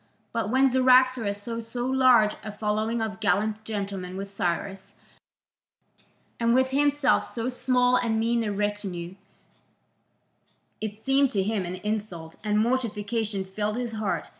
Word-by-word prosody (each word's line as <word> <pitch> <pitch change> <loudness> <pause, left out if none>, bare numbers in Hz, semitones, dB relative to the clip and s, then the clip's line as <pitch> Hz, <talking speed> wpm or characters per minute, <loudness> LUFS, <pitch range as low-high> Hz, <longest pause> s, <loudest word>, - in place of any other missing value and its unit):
But 230 -2 -1
when 260 +3 +4
Cyaxares 255 -4 +4
saw 230 +3 -5
so 235 +2 -4
large 255 -5 +4
a 215 - -5
following 215 +2 -1
of 210 -4 -4
gallant 215 +2 0
gentlemen 195 -4 -4
with 195 0 -6
Cyrus, 195 +1 -3 1.4
and 235 0 +3
with 260 0 +3
himself 290 +1 +3
so 230 +1 -3
small 250 0 +2
and 225 -3 0
mean 230 +1 +1
a 210 - -2
retinue, 200 -4 -3 1.7
it 215 -1 -3
seemed 270 +5 +2
to 195 -2 +2
him 205 -2 -1
an 180 - -4
insult, 185 -5 -4
and 210 -1 +1
mortification 220 -3 -1
filled 210 +3 -3
his 245 -2 -3
heart. 215 -3 -2
220 Hz, 140 wpm, -26 LUFS, 205-245 Hz, 1.7 s, when